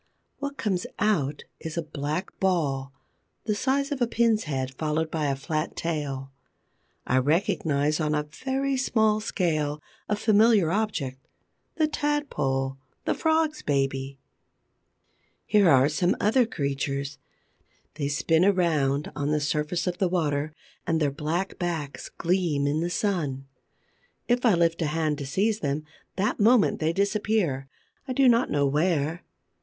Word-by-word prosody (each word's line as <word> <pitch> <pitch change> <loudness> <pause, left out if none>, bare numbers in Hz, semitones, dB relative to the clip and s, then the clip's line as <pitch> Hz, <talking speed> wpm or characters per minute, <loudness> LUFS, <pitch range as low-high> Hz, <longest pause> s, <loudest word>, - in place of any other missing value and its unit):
What 280 0 -4
comes 190 -4 -1
out 155 -10 0 0.2
is 160 +1 -6
a 170 - 0
black 155 +4 -4
ball, 145 -8 0 0.5
the 215 - +1
size 275 +6 0
of 275 -3 -3
a 240 - +3
pin's 230 -3 +2
head, 135 -3 -3
followed 155 +3 -1
by 155 -2 0
a 140 - +1
flat 155 +3 -3
tail. 140 -5 -3 0.7
I 130 - +3
recognize, 155 - +1
on 155 -1 +1
a 150 - 0
very 265 - -2
small 220 -4 +2
scale, 155 -8 -1 0.3
a 210 - +2
familiar 210 -4 +4
object: 150 -11 -2 0.5
the 315 -2 +2
Tadpole, 145 - -1 0.3
the - - +2
Frog's 315 -1 +1
baby. 135 -1 -1 1.3
Here 205 -4 +4
are 135 -2 +6
some 165 +4 +1
other 225 +3 +3
creatures. 140 -3 -3 0.7
They 145 -2 -2
spin 160 +3 +2
around 155 -7 +2
on 145 0 -1
the 150 0 +2
surface 150 +3 -1
of 180 -1 -2
the 190 - +2
water 155 -4 0 0.4
and 160 -1 +2
their 145 -3 +1
black 160 +6 -3
backs 165 -6 -3
gleam 170 -5 0
in 145 +2 +1
the 170 +2 -1
sun. 160 -9 -1 0.8
If 245 0 +2
I 210 - +5
lift 170 0 +1
a 160 - +1
hand 155 -1 -1
to 140 - -5
seize 210 +9 +1
them, 145 -4 -2 0.3
that 200 +3 0
moment 225 +1 +4
they 155 +1 +1
disappear, 200 -7 0 0.4
I 255 - -2
do 270 +1 +4
not 235 +1 +4
know 145 -1 +2
where. 155 +2 +1
160 Hz, 145 wpm, -26 LUFS, 145-210 Hz, 1.3 s, are